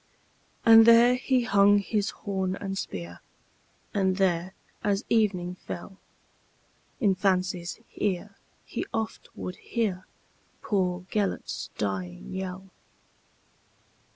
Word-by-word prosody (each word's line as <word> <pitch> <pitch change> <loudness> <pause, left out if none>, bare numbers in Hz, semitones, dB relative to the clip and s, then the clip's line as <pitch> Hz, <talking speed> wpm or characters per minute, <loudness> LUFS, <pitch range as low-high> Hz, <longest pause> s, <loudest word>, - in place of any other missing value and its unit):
And 225 0 +9
there 235 +1 +8
he 250 0 +1
hung 205 -3 +5
his 205 +1 0
horn 190 -3 -3
and 195 -1 -4
spear, 85 - -6 0.7
And 190 -2 +1
there, 185 -1 +1 0.3
as 200 +1 0
evening 195 -6 +1
fell, 190 +2 -7 1.0
In 205 -7 +3
fancy's 185 -2 0 0.2
ear 200 0 -2 0.3
he - - -4
oft 220 -1 -4
would 180 - -6
hearPoor 185 -3 -3
Gêlert's 205 -2 -2
dying 90 - -4
yell. 190 0 -5
195 Hz, 100 wpm, -27 LUFS, 180-210 Hz, 1.0 s, And